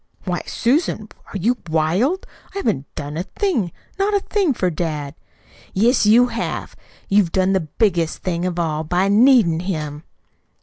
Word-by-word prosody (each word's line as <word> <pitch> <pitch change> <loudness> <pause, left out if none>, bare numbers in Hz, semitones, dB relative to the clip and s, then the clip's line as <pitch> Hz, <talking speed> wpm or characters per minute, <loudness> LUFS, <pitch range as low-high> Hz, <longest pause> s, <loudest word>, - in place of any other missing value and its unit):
"Why, 180 -2 -2
Susan, 235 -4 0 0.2
are - - -3
you 235 +7 +1
wild? 180 - +1 0.3
I - - -3
haven't 155 - -1
done 145 +1 -5
a - - 0
thing, 240 - -1 0.3
not 405 +1 +2
a - - +4
thing 395 -4 0
for 185 -4 0
dad." 150 -4 -3 0.6
"Yes, 225 +2 +3
you 235 +4 +7
have. - - -4 0.3
You've 195 -4 +3
done 190 0 +2
the 190 - +3 0.2
biggest 175 -8 +1
thing 175 -2 -1
of 175 -1 -3
all 160 -2 -1
by 180 +5 +1
NEEDIN' 215 -6 +5
him." 155 -5 -4
190 Hz, 160 wpm, -20 LUFS, 165-235 Hz, 0.6 s, you